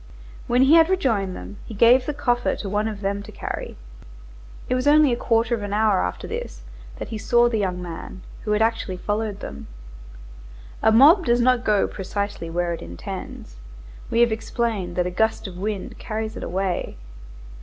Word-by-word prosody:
When 245 +2 +4
he 270 +4 +5
had 330 0 +6
rejoined 225 - 0
them, 90 +3 -9
he 220 - -9
gave 245 +4 +5
the 300 - -1
coffer 245 -3 0
to 205 - -6
one 210 +2 0
of 210 -2 -5
them 200 0 -2
to - - -11
carry. - - -6 0.9
It - - 0
was 255 +2 0
only 295 -3 +6
a - - +1
quarter 230 -1 +1
of 230 - -1
an 205 0 -4
hour 215 - +3
after 90 0 -3
this - - -6 0.3
that - - -6
he 220 - -5
saw 240 +2 +3
the 225 -2 0
young 185 -3 -1
man, 175 +2 -8 0.2
who 210 - -1
had 210 +1 +3
actually 225 -4 -1
followed 210 +1 -3
them. 70 +1 -8 1.1
A 220 - +4
mob 305 - +7
does 240 0 +3
not 250 0 +3
go 210 -3 +2
precisely 200 -3 -4
where 175 +1 -1
it 165 - -6
intends. 85 -7 -8 0.5
We 235 - +2
have 240 -1 +4
explained 220 -5 -2
that 180 - +1
a 180 - -2
gust 220 +5 0
of 190 -3 -7
wind 205 -1 -4
carries 220 0 -4
it - - -7
away. 185 - -2
215 Hz, 190 wpm, -23 LUFS, 185-240 Hz, 1.1 s, mob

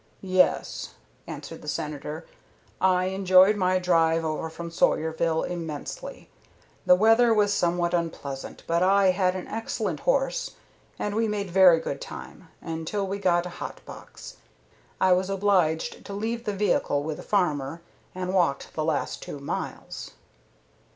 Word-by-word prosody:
"Yes," 185 - +1 0.3
answered - - -8
the - - -12
Senator. 150 +2 -4 0.6
"I 185 -1 +3
enjoyed 190 +1 +5
my 185 -2 +2
drive 165 -2 +2
over 155 +1 -2
from 170 +1 -7
Sawyerville 160 0 +1
immensely. 175 - -6 0.6
The 180 - +8
weather 225 +4 +5
was 205 -1 +3
somewhat 175 -1 +1
unpleasant, 155 -5 -4
but 170 +1 +1
I 195 0 +5
had 185 0 +1
an 185 - -5
excellent 225 +1 -3
horse - - 0 0.4
and 205 - -2
we 225 +1 +1
made 205 -3 -3
very 180 -3 +7
good - - -5
time, - - -9
until 165 +5 -3
we 195 +1 -4
got 175 -3 +2
a - - -4
hot - - -6
box. - - -11 0.6
I 185 -1 +5
was 185 +1 +1
obliged 190 -5 +1
to 200 - -7
leave 230 +3 -3
the 210 - -1
vehicle 190 -7 +1
with 155 0 -4
a - - -6
farmer, 165 -5 -1 0.3
and 185 0 -3
walked 170 -7 +1
the 155 - -2
last 155 -2 -1
two - - -7
miles." 140 - -6
180 Hz, 145 wpm, -26 LUFS, 160-200 Hz, 0.6 s, The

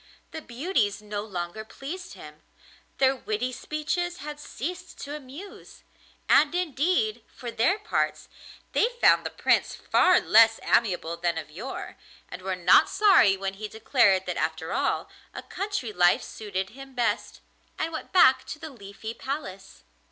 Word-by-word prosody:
The 315 - -6
beauties 245 - -1
no 210 -1 -5
longer 185 0 -5
pleased 315 +11 -8
him, - - -12 0.6
their 265 0 +3
witty 240 0 -3
speeches 305 +6 -3
had 295 -1 -7
ceased 350 +5 -6
to 285 +1 -6
amuse; 300 +8 -11 0.4
and 305 +2 +4
indeed, 360 - 0
for 240 -2 -6
their 255 - +2
parts, 430 - -2 0.4
they - - +3
found - - +5
the - - -3
Prince - - +1
far 365 - +4
less 225 0 +5
amiable 175 -6 +1
than 170 -1 -1
of 155 -2 -6
yore, 225 - -7 0.3
and 180 - -8
were 190 0 -2
not 180 - +5
sorry 385 - +5
when 195 0 -3
he 215 +2 -6
declared 215 -3 +2
that, 180 - -3
after 160 +1 -2
all, - - 0 0.3
a - - -6
country 395 - -4
life 175 -2 +4
suited 195 -3 -5
him 270 +2 -12
best, 240 -2 -1 0.4
and 325 +1 -2
went - - -6
back 345 -8 +6
to - - -7
the 315 0 -8
Leafy 220 -1 -8
Palace. 230 -9 -7
240 Hz, 150 wpm, -26 LUFS, 195-310 Hz, 0.6 s, back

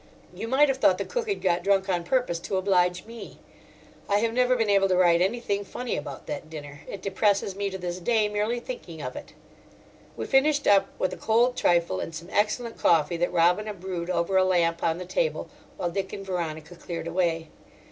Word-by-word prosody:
You 225 - -6
might 270 +5 +4
have 270 -1 -1
thought 185 -8 +4
the 200 - -3
cook 475 -3 -3
had 400 - -2
got 175 -2 +2
drunk 195 -1 +2
on 175 -3 0
purpose 245 -5 0
to 190 +3 -3
oblige 180 -2 +1
me. 230 0 -10 0.7
I 200 - +4
have 225 +2 0
never 250 +1 +3
been 225 -3 +1
able 195 -1 +4
to 185 -1 +2
write 175 -1 +4
anything 205 0 0
funny 245 +5 -4
about 145 -2 -6
that 150 +1 -6
dinner; 145 -2 -9
it 195 - -8
depresses 200 0 +1
me 200 0 -2
to 190 - -5
this 180 -1 -4
day, 220 +3 +2
merely 210 +3 -1
thinking - - -8
of - - -5
it. - - -9 0.8
We - - -3
finished 285 +2 +3
up 195 -1 +5
with 185 - -1
a - - -7
cold 240 +3 +2
trifle 170 - +2
and 165 - -5
some 170 +3 -8
excellent 225 +3 0
coffee 165 0 +3
that 175 +1 0
Robina 180 +5 +2
brewed 180 -2 -5
over 180 +1 +1
a 190 - +5
lamp 170 -2 +1
on 165 0 +1
the 180 - -6
table 480 - -1 0.3
while 175 - -2
Dick 190 +1 -3
and 195 - -6
Veronica 165 -3 -4
cleared 170 -1 -6
away. 170 -2 -1
190 Hz, 210 wpm, -26 LUFS, 170-220 Hz, 0.8 s, up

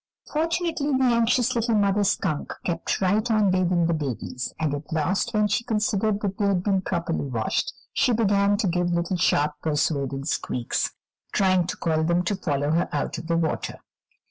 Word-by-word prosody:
Fortunately, 320 -3 0
the 265 - +1
anxious 245 +1 +3
little 230 -1 +1
mother 205 0 +2
skunk 190 -5 -1
kept 170 +1 -1
right 210 +5 +2
on 215 -3 +3
bathing 180 -2 +2
the 170 - +1
babies, 130 -4 -4
and 155 -2 0
at 145 +1 -6
last, 170 +4 0
when 210 -1 +2
she 210 +4 0
considered 210 -2 0
that 195 -2 -3
they 205 - +2
had 190 -3 +1
been 195 -2 +1
properly 170 -5 -2
washed, 125 - -1 0.2
she 255 - +2
began 205 -3 +3
to 205 -2 0
give 175 0 0
little 175 +1 0
sharp, 150 -3 +2
persuading 140 -3 -1
squeaks, 125 -5 -1 0.4
trying 185 -3 +3
to - - -4
call 160 -2 0
them 170 +2 +2
to 200 +3 0
follow 145 -5 -1
her 170 +2 +1
out 145 - -2
of 160 - -9
the 170 0 +1
water. 160 -2 -2
185 Hz, 180 wpm, -25 LUFS, 160-210 Hz, 0.4 s, anxious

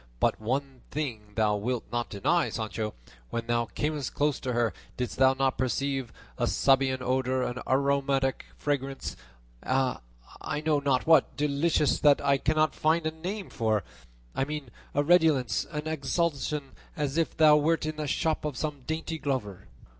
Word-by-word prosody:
But - - +1
one 130 +3 -2
thing 115 -8 -4
thou 105 -2 +2
wilt 120 +4 -2
not 120 0 -1
deny, 160 - +1
Sancho; 110 -1 -3 0.3
when 115 0 -3
thou 120 0 +1
camest 150 0 -3
close 145 -1 +1
to 130 - -3
her 120 -1 +1 0.2
didst 125 -1 -3
thou 130 0 +5
not 135 -1 0
perceive 130 0 -1 0.3
a - - +2
Sabaean 135 -1 +3
odour, 130 0 +1
an 125 0 -3
aromatic 135 0 +1
fragrance, 135 -2 -2 0.5
a, 130 -1 0 0.4
I 150 - -3
know 155 -1 +2
not 140 -3 +1
what, 160 0 +4
delicious, 150 +1 +2
that 145 -2 +5
I 140 -1 +2
cannot 155 +1 +2
find 160 +1 +1
a 160 - +1
name 185 +6 -5
for; 110 -2 0 0.5
I - - 0
mean 145 -3 -5 0.2
a 145 - +3
redolence, 150 -9 +3
an 150 -1 -4
exhalation, 150 -2 -1 0.3
as 145 -1 -1
if 165 - -1
thou 155 -1 +7
wert 155 +1 +1
in 155 0 -3
the 150 -1 -3
shop 155 +3 0
of 150 -4 -3
some 145 +2 -3
dainty 160 0 -3
glover?" 125 -10 -3
140 Hz, 160 wpm, -28 LUFS, 125-150 Hz, 0.5 s, thou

